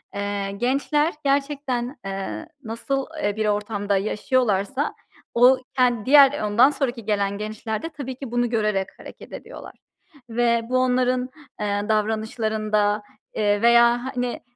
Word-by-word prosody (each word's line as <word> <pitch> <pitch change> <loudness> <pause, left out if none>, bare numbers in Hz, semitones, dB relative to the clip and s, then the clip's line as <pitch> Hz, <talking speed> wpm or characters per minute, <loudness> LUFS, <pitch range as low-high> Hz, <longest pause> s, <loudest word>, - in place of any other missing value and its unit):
Eee, 200 -1 -2
gençler 280 +8 0
gerçekten, 275 -2 -1
eee, 195 +11 -5 0.2
nasıl, 265 +4 -3 0.2
eee, 205 - 0
bir 215 0 -1
ortamda 205 -1 0
yaşıyorlarsa, 215 +4 0 0.4
o 250 +2 +6 0.2
ken 245 -4 +2
diğer 285 +1 +6
ondan 215 +6 +5
sonraki 255 -6 -3
gelen 200 -1 0
gençler 215 +1 -4
de 325 - -5
tabii 275 -4 -7
ki 260 -2 -8
bunu 240 -1 +1
görerek 210 -4 0
hareket - - -12
ediyorlar - - -10 0.5
ve 235 0 +2
bu 255 - +2
onların, 255 0 +1 0.3
eee, 205 -1 -1
davranışlarında, 215 -1 0 0.3
eee, 205 -1 +1
veya, 235 +1 +5
hani, 245 -1 -2
235 Hz, 130 wpm, -23 LUFS, 210-255 Hz, 0.5 s, o